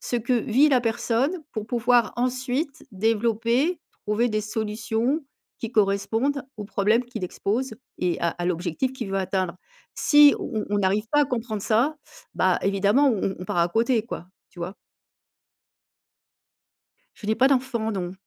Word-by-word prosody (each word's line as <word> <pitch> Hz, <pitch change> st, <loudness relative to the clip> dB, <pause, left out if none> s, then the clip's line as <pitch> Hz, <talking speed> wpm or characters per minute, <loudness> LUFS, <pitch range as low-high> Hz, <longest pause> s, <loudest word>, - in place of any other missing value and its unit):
ce 245 Hz, -, -2 dB
que 235 Hz, +2 st, -1 dB
vit 245 Hz, +5 st, +3 dB
la 255 Hz, -, +4 dB
personne, 235 Hz, +5 st, 0 dB, 0.2 s
pour 215 Hz, -1 st, -4 dB
pouvoir, 240 Hz, -1 st, +2 dB
ensuite, 255 Hz, +4 st, -2 dB
développer, 230 Hz, -, +1 dB, 0.3 s
trouver 225 Hz, +4 st, +2 dB
des 215 Hz, 0 st, 0 dB
solutions 220 Hz, +5 st, -1 dB, 0.4 s
qui 230 Hz, -, -5 dB
correspondent 225 Hz, +7 st, +1 dB
aux 210 Hz, -, -6 dB
problèmes 215 Hz, +4 st, +1 dB
qu'il 245 Hz, -5 st, -7 dB
expose 220 Hz, +7 st, -2 dB, 0.2 s
et 180 Hz, -2 st, 0 dB
à 170 Hz, -, +2 dB
à 175 Hz, -, -5 dB
l'objectif 180 Hz, +8 st, -1 dB
qu'il 235 Hz, -6 st, -5 dB
veut 195 Hz, -, 0 dB
atteindre. 185 Hz, -2 st, -1 dB, 0.4 s
Si 295 Hz, -1 st, +6 dB
on 215 Hz, -1 st, -3 dB
on 205 Hz, -, +1 dB
arrive 200 Hz, +3 st, +1 dB
pas 295 Hz, -, +5 dB
à -, -, +3 dB
comprendre 230 Hz, -5 st, -3 dB
ça, 250 Hz, +8 st, +2 dB, 0.4 s
bah, 185 Hz, -1 st, +2 dB
évidemment, 200 Hz, +8 st, +3 dB
on 215 Hz, -5 st, -1 dB
on 195 Hz, -, -1 dB
on -, -, -5 dB
part 175 Hz, -, -2 dB
à 170 Hz, 0 st, +3 dB
côté 230 Hz, +4 st, +2 dB
quoi, 180 Hz, -, -7 dB, 0.2 s
tu 180 Hz, -, -17 dB
vois? 175 Hz, +3 st, -4 dB, 2.4 s
Je 210 Hz, -, -10 dB
n'ai 220 Hz, -, +2 dB
pas 260 Hz, +4 st, +4 dB
d'enfants, 250 Hz, -4 st, 0 dB
non. 180 Hz, -3 st, -3 dB
225 Hz, 160 wpm, -25 LUFS, 200-250 Hz, 2.4 s, Si